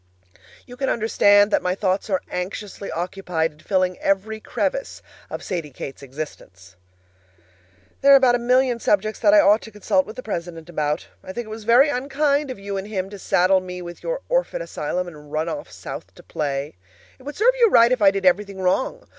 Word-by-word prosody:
You 245 - -12
can 270 0 -1
understand 205 -2 +4
that - - +3
my 180 0 -1
thoughts 195 +1 -1
are 190 -2 0
anxiously 195 +2 -5
occupied 175 -2 -2
in 150 - -24
filling 185 0 0
every 205 +3 0
crevice - - -3 0.3
of - - -6
Sadie 170 -5 -4
Kate's 135 +1 -8
existence. 125 -10 -9 1.3
There 280 - +6
are 260 -2 +5
a - - -1
million 250 0 +2
subjects 215 0 0
that 305 - +4
I 310 - +7
ought 210 -4 +4
to - - -10
consult 200 -2 0
with 215 - -9
the 255 - -7
president 170 -4 -6
about. 150 -1 -2 0.2
I 190 - -8
think 240 +2 -4
it - - -12
was 220 -1 -8
very 245 +6 +6
unkind 280 +2 0
of 255 - -5
you 200 0 -5
and 195 +1 -5
him 195 -2 -4
to 205 - -9
saddle 185 +1 +3
me 180 -1 -7
with 175 -1 -9
your - - -3
orphan - - 0
asylum 180 - -3
and 150 -3 -12
run 155 +2 -1
off 290 - -5
South - - -9
to - - -15
play. 140 -1 -3 0.5
It - - -17
would 290 +2 -7
serve 480 +4 +4
you 465 -2 +6
right 235 -8 +6
if 250 -3 +1
I 200 - +7
did 195 -1 -3
everything 195 +2 +2
wrong. 260 - 0
200 Hz, 200 wpm, -22 LUFS, 180-250 Hz, 1.3 s, I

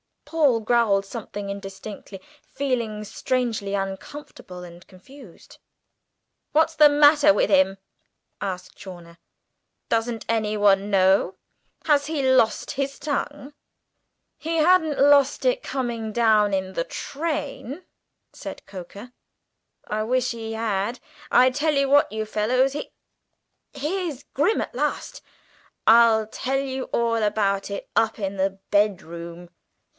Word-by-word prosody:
Paul 285 -8 +2
growled 215 -3 +2
something 205 -2 -7
indistinctly, 200 0 -8 0.2
feeling 235 -6 -3
strangely 225 -2 -2
uncomfortable 195 -1 -7
and 175 0 -13
confused. 200 +2 -16 1.0
"What's 320 +1 +3
the 300 -2 +7
matter 295 0 +5
with - - +1
him?" 280 -10 +3 0.6
asked 190 -2 -6
Chawner. 175 -3 -11 0.7
"Does 225 +1 +1 0.2
anyone 210 -3 +2
know? 190 -1 +3 0.5
Has 290 -2 +3
he 305 -2 -2
lost 260 -4 +2
his 275 -1 -3
tongue?" 290 -1 -4 0.8
"He 325 +1 -3
hadn't 320 -2 +3
lost 280 -1 +4
it - - +1
coming 235 - -4
down 215 -3 +3
in 190 0 -2
the 170 -2 -2
train," 300 0 -5 0.5
said - - -9
Coker: 200 +5 -10 0.7
"I 215 0 -2
wish 255 +2 0
he 225 -1 -6
had. 220 +1 -2 0.3
I 255 +1 +5
tell 295 +4 0
you 275 -1 +1
what, 285 +1 +4
you 220 0 -3
fellows 245 +5 +1
He 295 +2 -6 0.8
here's 315 -2 -3
Grim 445 - +2
at - - -5
last! - - -3 0.6
I'll 225 -1 +6
tell 260 +5 -3
you 265 -1 -3
all 230 -1 0
about 200 -2 0
it 200 - -6
up 225 - +2
in 195 -2 -4
the 195 0 -1
bedroom." 175 -4 -1
230 Hz, 120 wpm, -24 LUFS, 200-280 Hz, 1.0 s, the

